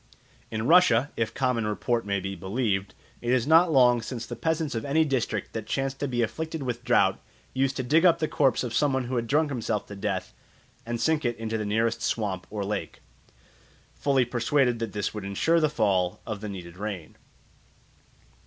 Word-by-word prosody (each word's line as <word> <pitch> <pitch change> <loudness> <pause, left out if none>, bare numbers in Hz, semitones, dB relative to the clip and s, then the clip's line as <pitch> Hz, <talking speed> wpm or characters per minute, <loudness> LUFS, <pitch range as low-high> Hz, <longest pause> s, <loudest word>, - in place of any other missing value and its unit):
In 110 0 -3
Russia, 145 -5 +5
if 115 -1 -1
common 125 -5 0
report 115 +1 -1
may 100 -1 0
be 95 +1 -4
believed, 95 +1 -2 0.3
it 120 - -3
is 125 -2 +2
not 165 +3 +5
long 125 -4 +5
since 120 0 -5
the - - -6
peasants 160 -2 -1
of 115 -1 -3
any 155 +3 +2
district 135 -5 -2
that - - -5
chanced 135 0 -2
to 145 - -1
be 120 -2 0
afflicted 160 +6 -4
with 120 -2 -4
drought - - +3 0.3
used 135 0 +1
to 130 - -1
dig 155 +7 +3
up 175 -3 +6
the 155 - -1
corpse 135 -5 +2
of 120 -3 -4
some 145 +2 +2
one 130 0 0
who 125 +1 -4
had 115 -1 -1
drunk 150 +3 +2
himself 110 -5 -2
to 100 - -9
death 100 -2 -3 0.5
and 120 0 -2
sink 160 +2 +1
it 120 -2 -1
in 115 0 -5
the 110 -1 -1
nearest 115 +2 0
swamp 95 -5 -2
or 105 -2 -3
lake, 105 +1 -4 0.9
fully 135 -3 +2
persuaded 120 +1 +1
that 115 -3 -4
this 105 -1 -2
would 105 -2 -5
ensure 100 +13 +2
the 155 -2 +2
fall 95 -9 +1
of 105 -3 -5
the 105 - -5
needed 90 -3 -8
rain. 100 -5 -6
120 Hz, 200 wpm, -27 LUFS, 105-135 Hz, 0.9 s, up